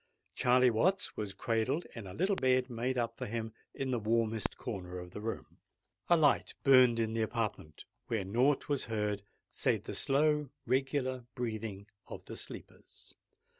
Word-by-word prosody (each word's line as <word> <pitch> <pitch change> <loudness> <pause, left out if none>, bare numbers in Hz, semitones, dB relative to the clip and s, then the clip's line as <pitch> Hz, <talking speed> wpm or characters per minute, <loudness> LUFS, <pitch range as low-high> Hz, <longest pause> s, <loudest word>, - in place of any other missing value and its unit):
Charley 125 0 +4
Watts 185 - +1
was 100 -2 -4
cradled 115 - 0
in 110 -4 -7
a 90 - -8
little 195 +3 +2
bed 130 -3 +2
made 125 +2 -1
up 120 -1 -2
for - - -3
him 110 0 -4 0.2
in 135 -1 -3
the 120 - +1
warmest 110 0 0
corner 90 -3 -5
of 90 0 -8
the 105 - -7
room. 115 +1 -5 0.5
A 175 - +6
light 150 -3 +3
burnt 130 -3 +7
in 110 -1 0
the 115 - 0
apartment, 110 -9 -3 0.2
where 110 -5 -1
naught 125 +8 +2
was 145 -2 0
heard 105 -2 -1 0.3
save - - 0
the - - -6
slow, 150 +1 +2 0.2
regular 130 -1 0
breathing 110 -5 -4 0.2
of - - -9
the - - -7
sleepers. - - -9
115 Hz, 165 wpm, -33 LUFS, 110-130 Hz, 0.5 s, burnt